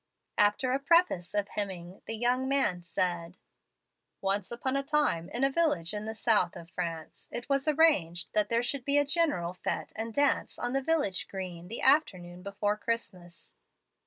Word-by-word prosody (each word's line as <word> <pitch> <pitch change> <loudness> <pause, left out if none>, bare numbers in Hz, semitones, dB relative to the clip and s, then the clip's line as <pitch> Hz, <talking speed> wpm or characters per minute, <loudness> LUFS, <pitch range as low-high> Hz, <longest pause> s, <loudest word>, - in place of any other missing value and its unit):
After 210 +5 +3
a 265 - +1
preface 280 - +2
of 205 -1 0
hemming, 185 -3 -5
the 225 - -2
young 250 +3 +1
man 265 -11 +2
said: 175 0 -2 0.8
"Once 195 0 -1
upon 260 +3 -2
a 275 - +2
time, 275 - 0
in 240 +5 -2
a 275 - +3
village 270 - +1
in 210 0 -4
the 220 0 -5
south 210 -5 +2
of 170 -1 -11
France, 165 -3 -5
it 240 - -5
was 275 +1 +1
arranged 270 - +3
that 210 -1 +2
there 235 +1 +2
should 265 +1 -1
be 280 +2 +2
a 290 - +4
general 285 - +1
fete 185 - -3
and 225 +1 -3
dance 285 +4 +1
on 245 +1 -2
the 270 - +1
village 280 - 0
green 180 -3 -6
the 225 - -4
afternoon 180 - +3
before 205 +2 -1
Christmas. 185 -6 -4
210 Hz, 175 wpm, -30 LUFS, 180-270 Hz, 0.8 s, a